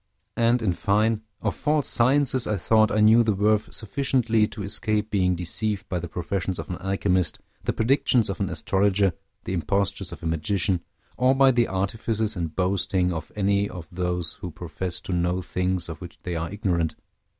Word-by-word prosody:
And, 115 +1 +2
in 95 -5 +2
fine, 105 +4 +1 0.2
of - - 0
false 150 -2 0
sciences 130 +1 +2
I 105 - 0
thought 110 +4 +3
I 110 - +1
knew 110 +2 +7
the 110 -3 +2
worth 105 +2 +2
sufficiently 115 -2 +1
to 105 -1 -7
escape 105 +2 -1
being 90 -3 +2
deceived 100 +4 -1
by 90 - -1
the 85 - -5
professions 90 +2 -3
of - - -6
an 90 - -3
alchemist, 95 -3 0 0.3
the - - +2
predictions 120 -1 +2
of 95 - -4
an 95 -2 -1
astrologer, 95 +1 +2 0.3
the - - -4
impostures 95 +2 0
of 85 -2 -10
a - - -5
magician, 85 +3 0 0.4
or 130 +2 +4
by 135 0 +6
the 120 -2 +2
artifices 110 +3 -1
and 85 -3 -4
boasting 90 -1 +1
of 80 - -6
any 100 0 +1
of 85 -3 -8
those 90 -2 -2
who 90 - -4
profess 85 +2 -5
to 95 - -4
know 90 +1 +1
things 90 0 -1
of 80 +1 -8
which 90 -1 -9
they 90 -2 -3
are 80 0 -2
ignorant. 90 -6 -1
100 Hz, 185 wpm, -25 LUFS, 90-110 Hz, 0.4 s, knew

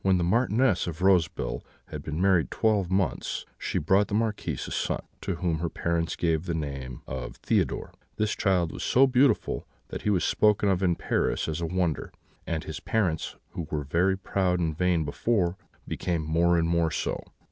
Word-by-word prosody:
"When 95 -1 +4
the 90 - 0
Marchioness 115 +2 +2
of 85 +1 -4
Roseville 85 -10 +2 0.3
had 75 - -6
been 75 +2 -4
married 95 -3 +3
twelve 105 -5 +1
months 95 -1 -1
she - - -2
brought 95 +6 +3
the 100 - -2
Marquis 110 -1 0
a - - -8
son, - - -1 0.2
to 95 - -2
whom 85 -2 -1
his 85 0 -1
parents 85 -1 0
gave 80 -1 0
the 85 - -1
name 70 -5 -5
of 65 -1 -5
Theodore. - - -1 0.2
This 110 0 0
child 90 -5 +1
was - - -7
so 135 +2 +5
beautiful 130 +1 +2 0.2
that - - -5
he - - 0
was 95 -4 +2
spoken 105 -1 +3
of 95 -1 +1
in 90 -3 +3
Paris - - 0
as 80 +1 -3
a 85 - -1
wonder, 90 -2 -1 0.4
and 80 -2 -2
his - - -6
parents, 90 -8 -1 0.2
who 85 - -5
were 75 -1 -2
very 90 +7 +2
proud 95 -2 0
and 80 -3 0
vain 90 -2 +1
before, 90 +3 0 0.3
became 85 -3 -1
more 85 +3 +3
and 80 0 +2
more 85 -1 +2
so. - - -2
85 Hz, 190 wpm, -27 LUFS, 80-95 Hz, 0.4 s, so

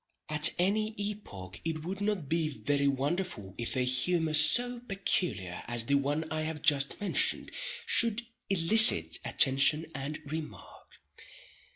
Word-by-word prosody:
At 150 +1 +4
any 215 +4 -1
epoch 200 - -8
it 160 -1 -5
would 190 +4 -7
not 205 -7 -3
be 160 +1 -2
very 140 -1 -2
wonderful 140 - -4
if 120 +3 +1
a 130 - -1
humor 155 +6 +1
so 240 +12 +3
peculiar 180 - -3
as 120 -1 -2
the 140 - -2
one 145 +3 -1
I 155 0 -3
have 155 -1 -6
just 145 -3 +1
mentioned, 205 - 0 0.3
should 230 -1 +3 0.3
elicit 170 - +6
attention 135 +4 +2
and 145 +2 -6
remark. 155 +2 -10
155 Hz, 135 wpm, -28 LUFS, 140-195 Hz, 0.3 s, elicit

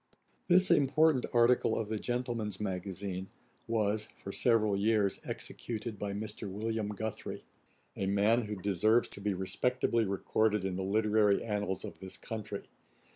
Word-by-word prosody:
] - - -36
This 185 +1 +6
important 150 -2 +4
article 120 -1 +4
of 110 - -2
the 110 0 -2
Gentleman's 120 -5 -2
Magazine 95 -1 -4 0.4
was, 110 -1 0
for 100 - -7
several 110 -2 +3
years, 105 -1 +2
executed 110 -2 -5
by 100 -1 -2
Mr. 105 0 -5
William 110 +2 -2
Guthrie, 105 +1 -5 0.5
a 95 - -2
man 105 +4 +3
who 105 0 -4
deserves 105 +4 +2
to 100 - -11
be 100 -1 0
respectably 115 +5 +1
recorded 105 +1 +1
in 95 -1 -2
the 95 - -2
literary 105 +1 +3
annals 105 -3 -2
of - - -9
this 95 -1 -6
country. 105 +2 -6
105 Hz, 145 wpm, -32 LUFS, 100-115 Hz, 0.5 s, This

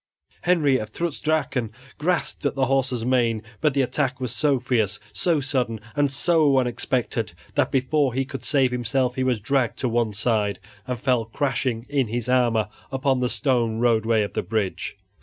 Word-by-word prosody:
Henry 150 -7 +3
of 110 0 -6
Trutz 170 +1 -3
Drachen 150 -6 0 0.3
grasped 175 +2 -1
at 140 - -3
his 135 - +1
horse's 130 -3 0
mane, 120 -4 +1 0.2
but 150 -3 +1
the 135 - +3
attack 130 0 -1
was 125 -3 -2
so 140 0 +2
fierce, 115 -5 0
so 160 - +2
sudden, 125 -5 -1 0.2
and 145 -2 +2
so 150 0 +3
unexpected 125 -1 -1 0.2
that - - +1
before 135 0 +1
he 135 0 0
could 135 0 -7
save 135 -4 +3
himself 125 +1 0
he 130 - -1
was 125 -3 +1
dragged 120 +2 0
to 130 - -1
one 120 -2 +1
side 105 -1 +1 0.3
and 125 -2 -3
fell 125 -2 +1
crashing 125 -1 -2
in 140 -4 0
his 120 +1 -3
armor 120 -4 +2 0.2
upon 135 -1 +1
the 125 -1 0
stone 120 -6 +1
roadway 115 -2 +2
of 100 - -5
the - - 0
bridge. 100 -1 -3
125 Hz, 175 wpm, -24 LUFS, 115-135 Hz, 0.3 s, Henry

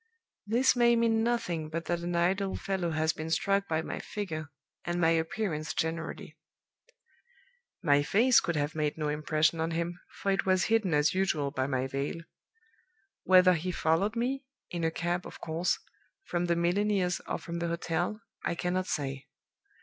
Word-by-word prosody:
"This 250 +5 +3
may 240 -1 +5
mean 230 -1 +3
nothing 225 -10 -1
but 165 +1 -4
that 175 -1 -1
an 175 0 -3
idle 190 +3 +1
fellow 190 -3 -2
has 160 0 +1
been 160 +1 -5
struck 195 +4 +1
by 160 0 0
my - - -4
figure, 155 -8 -5 0.3
and 175 0 -2
my 165 -1 +4
appearance 165 -1 -1
generally. 160 -1 -3 1.5
My 145 -3 +4
face 230 - +5
could 170 - -2
have 145 +1 -1
made 150 -1 -1
no 150 -1 -1
impression 155 +2 +1
on 165 - 0
him, 170 +1 -2
for 195 - -2
it 195 - +1
was 185 -1 +3
hidden 200 -8 +2
as 150 +1 +3
usual 155 -7 0
by 130 -1 -1
my 130 -2 0
veil. 140 +5 -3 1.0
Whether 185 0 +7
he 175 +2 -2
followed 180 +6 +1
me 260 +4 -1 0.3
(in 175 -1 -3
a 165 - +3
cab, 175 +2 -2
of - - -11
course) 165 +2 0 0.5
from 175 - -1
the 170 -1 +2
milliner's, 180 +1 +1
or - - -1
from 170 0 -6
the 170 - -1
hotel, 175 +4 -2 0.2
I - - -1
cannot 185 +2 -1
say. 135 -2 -3
170 Hz, 170 wpm, -30 LUFS, 160-195 Hz, 1.5 s, Whether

